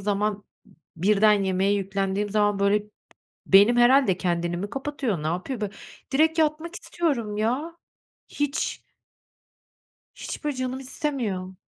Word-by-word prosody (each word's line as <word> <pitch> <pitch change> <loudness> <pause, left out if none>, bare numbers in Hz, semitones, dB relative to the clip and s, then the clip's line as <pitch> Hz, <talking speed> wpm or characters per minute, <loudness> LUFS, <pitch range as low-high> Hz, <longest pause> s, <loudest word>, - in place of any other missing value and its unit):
zaman, 205 +1 -1 0.5
b 165 - -11
birden 210 +1 +4
yemeğe 190 +1 +1
yüklendiğim 195 +1 -1
zaman 205 -1 +2
böyle, 200 +1 +3
b 210 - -25 0.6
beynim 205 +5 +6
herhâlde 240 -5 +5
kendini 175 -1 -1
mi 200 +3 -4
kapatıyor, 270 - -3
ne 155 - -3
yapıyor 185 - -3
bö 210 -2 -2 0.4
direkt 320 +3 +3
yatmak 315 +2 0
istiyorum 250 -12 -2
ya. 260 +10 -1 0.5
Hiç. 290 0 -2 1.3
Hiç - - -7
böyle 295 -3 -2
canım 255 0 -3
istemiyor. 245 - -3
210 Hz, 130 wpm, -25 LUFS, 195-270 Hz, 1.3 s, beynim